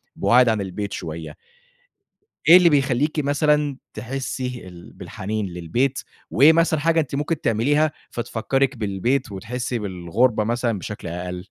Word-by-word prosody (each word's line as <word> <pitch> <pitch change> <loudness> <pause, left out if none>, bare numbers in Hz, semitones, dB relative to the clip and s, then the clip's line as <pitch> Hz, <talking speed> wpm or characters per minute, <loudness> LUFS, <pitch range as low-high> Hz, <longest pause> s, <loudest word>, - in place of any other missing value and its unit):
بُعاد 125 0 +4
عن 110 -2 0
البيت 100 +2 -5
شوية 80 -1 -6 1.1
إيه 170 +3 +10
اللي 180 -2 +5
بيخليكِ 145 +1 +1
مثلًا 145 -1 +1 0.2
تحسّي 125 -3 -5
ال 85 -1 -13
بالحنين 105 +2 -5
للبيت، 90 +10 -1 0.3
وإيه 150 +6 +6
مثلًا 165 -2 +2
حاجة 165 +2 +2
أنتِ 140 -3 -2
ممكن 150 +2 -2
تعمليها 145 +8 +2 0.2
فتفكرِك 125 +3 -1
بالبيت، 110 +4 -1
وتحسي 120 +4 -4
بالغربة 105 +4 0
مثلًا 115 -2 -1
بشكل 105 -1 -7
أقل؟ 90 +2 -6
120 Hz, 130 wpm, -22 LUFS, 100-140 Hz, 1.1 s, إيه